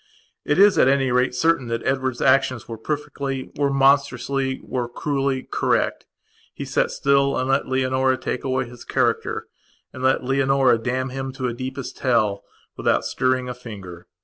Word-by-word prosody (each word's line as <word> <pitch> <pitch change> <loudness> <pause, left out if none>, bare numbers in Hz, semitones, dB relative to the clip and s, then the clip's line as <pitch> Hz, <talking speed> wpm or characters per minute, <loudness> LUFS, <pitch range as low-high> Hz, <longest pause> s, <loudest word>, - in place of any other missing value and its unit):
It 145 - 0
is, 200 +1 +6
at - - +5
any 135 -1 +2
rate, 125 0 +2
certain 160 -1 +2
that 115 0 -3
Edward's 130 -2 -1
actions 130 -3 +2
were 115 -2 -7
perfectlywere 140 0 -3
monstrously, 135 -1 +2
were 125 -2 -3
cruellycorrect. 135 0 -1 0.5
He - - -5
sat - - +1
still 140 0 +2
and 130 - -1
let 135 +1 +1
Leonora 130 0 +1
take 125 - -4
away 130 -1 0
his 120 0 -12
character, - - -1 0.5
and 130 - -8
let 130 0 +2
Leonora 135 -2 +3
damn 130 +3 -2
him 135 +1 -4
to 130 -2 -3
deepest 130 +2 -6
hell, 110 -6 +1 0.3
without - - +1
stirring 130 0 0
a 125 - -4
finger. 100 -8 -10
130 Hz, 150 wpm, -22 LUFS, 125-135 Hz, 0.5 s, is